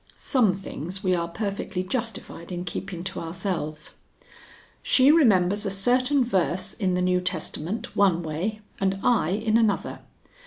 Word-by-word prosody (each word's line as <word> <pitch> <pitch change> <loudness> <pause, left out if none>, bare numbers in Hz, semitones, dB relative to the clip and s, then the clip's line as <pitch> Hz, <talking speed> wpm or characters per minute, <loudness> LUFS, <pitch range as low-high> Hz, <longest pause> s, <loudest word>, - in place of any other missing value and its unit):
Some 235 -9 +2
things 190 0 -6
we 185 -1 +2
are 170 -1 0
perfectly 195 0 -3
justified 215 -5 -5
in 175 0 -4
keeping 175 -1 -5
to 190 - -5
ourselves.) 165 -3 -4 0.9
"She 265 +2 +5
remembers 205 - +4
a 200 - -1
certain 250 +8 +2
verse 185 -4 0
in 185 -4 0
the 180 - 0
New 180 0 +2
Testament 180 +2 -3
one 185 -4 +3
way 180 +8 -3 0.2
and 195 0 +1
I 235 -10 +3
in 215 +3 +1
another. 220 -4 0
190 Hz, 145 wpm, -25 LUFS, 175-220 Hz, 0.9 s, She